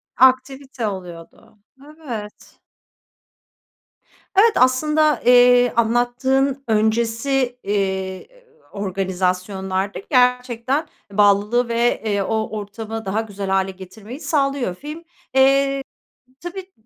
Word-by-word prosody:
Aktivite 260 -1 +2
oluyordu, 180 0 -9 0.3
evet. 270 -9 -9 1.8
Evet, 455 +3 +6
aslında, 300 +2 +3
eee, 245 0 +6
anlattığın 250 +4 +1
öncesi, 235 +4 0
eee, 190 -2 -2 0.4
organizasyonlarda 190 0 -2
gerçekten 250 +3 +1 0.2
bağlılığı 210 +4 +3
ve, 235 +1 +1
eee, 205 -2 0
o 220 +1 -2
ortamı 220 +1 -7
daha 205 +3 -1
güzel 200 -3 -6
hâle 190 0 +1
getirmeyi 195 +7 -11
sağlıyor 275 - -1
film. 300 - -9 0.3
Eee, 275 +1 +3 0.6
tabii, 370 +2 -8
235 Hz, 85 wpm, -20 LUFS, 200-270 Hz, 1.8 s, Evet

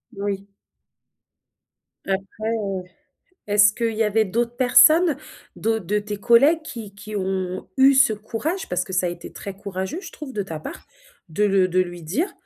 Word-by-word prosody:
Oui. 200 0 -4 1.6
Après, 195 0 -1 0.3
heu, 200 -5 -2 0.6
est-ce 205 0 +5
qu'il 230 0 -1
y 220 - +1
avait 220 0 +2
d'autres 235 +4 -2
personnes? 310 +5 +6 0.4
D'au 225 0 0
de 210 +1 -1
tes 205 0 -5
collègues, 275 +10 +4
qui 220 -9 -8
qui 210 +1 -9
ont, 185 -1 -3
eu 270 +1 +6
ce 265 -4 +5
courage? 230 - -4
Parce 180 0 -1
que 190 - -9
ça 180 0 +1
a - - 0
été 170 0 -8
très 200 - -7
courageux, 195 - -5
je 385 - -10
trouve, 295 -4 -8
de 210 - -2
ta 165 -5 -6
part, 155 - -9 0.4
de 185 +6 0
le 195 -2 +3
de 185 +1 +2
lui 175 -1 -4
dire, 210 - -2
205 Hz, 175 wpm, -23 LUFS, 190-235 Hz, 1.6 s, personnes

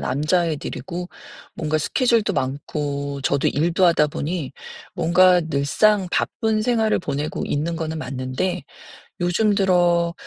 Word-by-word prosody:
남자애들이고 170 +4 -2 0.5
뭔가 155 -1 -1
스케줄도 230 - +1
많고 140 0 -3
저도 140 0 +1
일도 170 +5 +1
하다 165 -3 +4
보니 150 -1 -4 0.4
뭔가 180 +1 +4
늘상 165 +7 +2
바쁜 220 -1 0
생활을 225 -2 +1
보내고 150 -3 -3
있는 160 +4 -2
거는 160 0 -4
맞는데 135 +7 -3 0.6
요즘 200 +4 +2
들어 175 -3 +2
170 Hz, 265 characters per minute, -22 LUFS, 145-185 Hz, 0.6 s, 하다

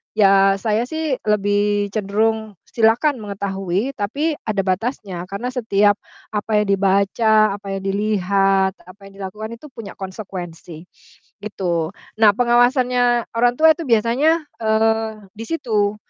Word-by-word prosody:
ya 195 -1 +5
saya 225 +1 0
sih, 315 -1 -2
lebih 205 0 +1
cenderung 220 +1 -1 0.2
silakan 235 +5 +2
mengetahui 200 +2 -3
tapi 285 +10 -1
ada 205 -3 0
batasnya. 190 -2 -3
Karena 215 +6 -4
setiap 210 -4 +2 0.3
apa 210 0 0
yang 210 - -2
dibaca, 200 +2 +3
apa 195 -1 -6
yang 195 - -6
dilihat, 195 -1 +1
apa 185 +3 -15
yang - - -19
dilakukan 210 +4 -6
itu 300 - -12
punya 220 -4 -9
konsekuensi, 180 -4 -8 0.6
gitu. 175 -5 -2 0.3
Nah, 215 -2 +7
pengawasannya 245 0 +2
orang 240 +1 +3
tua 320 0 +7
itu 335 - -6
biasanya, 260 +8 +2 0.2
eee, 220 -1 0
di 225 - -7
situ, 215 -10 0
210 Hz, 125 wpm, -20 LUFS, 195-230 Hz, 0.6 s, Nah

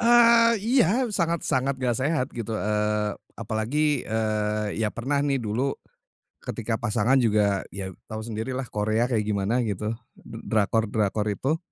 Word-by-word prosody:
Eee, 235 0 +6
iya, 245 0 +3
sangat-sangat 160 -7 0
nggak 125 -2 0
sehat 140 -1 +1
gitu, 115 -2 -3
eee, 105 0 0 0.3
apalagi, 120 +8 0
eee, 105 -1 -1
ya 110 - +2
pernah 140 +4 -1
nih 140 -2 +1
dulu 120 +5 -1 0.6
ketika 115 0 -3
pasangan 120 +3 +2
juga, 105 -4 +2
ya 95 -1 -5 0.2
tahu 110 0 -5
sendiri 115 +3 -4
lah 135 - -2
Korea 110 +3 0
kayak 110 -4 0
gimana 105 +3 0
gitu, 105 +1 -2 0.2
d - - -15 0.2
drakor-drakor 105 -1 +1
itu. 140 +10 -1
115 Hz, 140 wpm, -25 LUFS, 105-135 Hz, 0.6 s, Eee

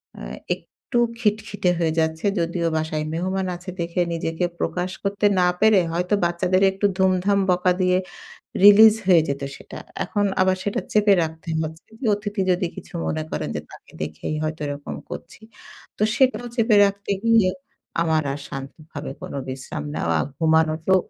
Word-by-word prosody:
অ্যা - - -8 0.3
একটু 245 - -7 0.2
খিটখিটে 210 -3 0
হয়ে 160 -2 +1
যাচ্ছে। 160 +2 -1
যদিও 170 0 0
বাসায় 155 -1 -2
মেহমান 185 +3 -1
আছে 180 +2 -9
দেখে 170 +1 -1
নিজেকে 165 +1 -1
প্রকাশ 180 +1 -2
করতে 200 +1 0 0.2
না 180 - +4
পেরে 215 -3 +6
হয়তো 180 +3 -1
বাচ্চাদের 180 +2 +1
একটু 195 +2 -2
ধুমধাম 190 +1 +2
বকা 180 0 +2
দিয়ে 180 0 +3 0.7
release 215 +2 +9
হয়ে 175 -4 +7
যেত 140 0 -2
সেটা। - - -10 0.3
এখন 205 +2 0 0.2
আবার 185 0 +3
সেটা 205 - -1
চেপে 210 -1 +5
রাখতে 160 +1 -6
হচ্ছে। 160 +1 -7 0.3
অতিথি 205 -1 -3
যদি 180 0 +1
কিছু - - -10
মনে 155 0 -1
করেন। - - -3
যে - - -2
তাকে - - -15
দেখেই 80 - -4
হয়তো 155 +1 -3
এরকম 145 0 -5
করছি। 170 - -9 0.6
তো - - +1
সেটাও 260 -2 +2
চেপে 230 -2 +3
রাখতে 200 0 -3
গিয়ে 225 -5 +5 0.5
আমার 160 -2 +2
আর 145 - -6
শান্তভাবে 135 +2 -7
কোন - - -7 0.2
বিশ্রাম 135 +3 -6
নেওয়া, 85 -1 0 0.2
ঘুমানোর 160 0 +2
তো 190 - +6
180 Hz, 155 wpm, -23 LUFS, 160-200 Hz, 0.7 s, release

